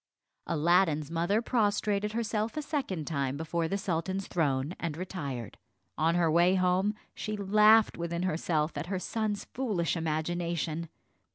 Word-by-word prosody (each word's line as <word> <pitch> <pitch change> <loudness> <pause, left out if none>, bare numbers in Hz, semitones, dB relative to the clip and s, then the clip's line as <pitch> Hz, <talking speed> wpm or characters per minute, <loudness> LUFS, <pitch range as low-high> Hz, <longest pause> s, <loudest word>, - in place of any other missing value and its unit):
Aladdin's 165 -2 +2
mother 175 +7 +1
prostrated 210 -3 +1
herself 225 +1 -1
a 305 - -1
second 265 - -2
time 140 -3 -1
before 165 +1 -1
the 195 - -1
sultan's 190 0 -2
throne, 145 -2 0
and 160 -3 -3
retired. 145 - -5 0.4
On 165 +2 +2
her 170 -2 +3
way 175 +3 +4
home, 185 +3 +2 0.2
she 215 0 -4
laughed 210 +2 +5
within 170 +1 -2
herself 160 -2 0
at 170 - -5
her 190 0 -1
son's 210 +2 -2
foolish 205 -11 0
imagination. 165 0 -2
175 Hz, 140 wpm, -30 LUFS, 160-205 Hz, 0.4 s, laughed